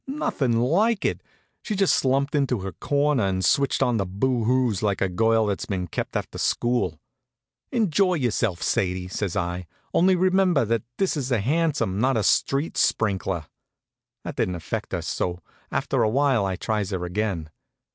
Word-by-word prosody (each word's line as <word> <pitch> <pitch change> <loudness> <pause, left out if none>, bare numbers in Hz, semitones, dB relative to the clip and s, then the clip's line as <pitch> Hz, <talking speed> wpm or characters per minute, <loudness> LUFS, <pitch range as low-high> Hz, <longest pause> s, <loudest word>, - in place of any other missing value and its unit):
Nothin' 135 - 0
like 195 - +2
it. - - 0 0.4
She 215 - -3
just 195 -1 +3
slumped 135 +2 +1
into 135 -7 +1
her 95 0 -4
corner 145 +2 +1
and 95 -1 0
switched 140 +8 +2
on 120 -2 +1
the 100 - 0
boo 115 +5 0
hoos 125 -4 +1
like 100 -3 0
a 95 - +2
girl 110 +4 +2
that's 100 -2 -2
been 95 -3 -2
kept 85 - -5
after - - -6
school. 120 -10 0 0.7
"Enjoy 195 - +2
yourself, 115 - -1
Sadie," 90 -1 0
says 95 -2 -3
I. 90 0 -2 0.3
"Only 185 +2 +4
remember 185 -6 +3
that 115 0 0 0.2
this 195 -3 +1
is 135 -3 -3
a 120 - +2
hansom, 135 - 0
not 130 +1 +2
a 110 - +1
street 140 +9 +1
sprinkler." 95 -6 0 0.8
That - - -6
didn't 90 -1 -1
fetch - - -3
her; - - -2
so 90 0 -3 0.3
after - - 0
a 110 - +3
while 130 -4 +2
I 95 - -2
tries 105 +1 -2
her 90 -3 -3
again. 90 -4 -2
115 Hz, 170 wpm, -24 LUFS, 95-145 Hz, 0.8 s, Only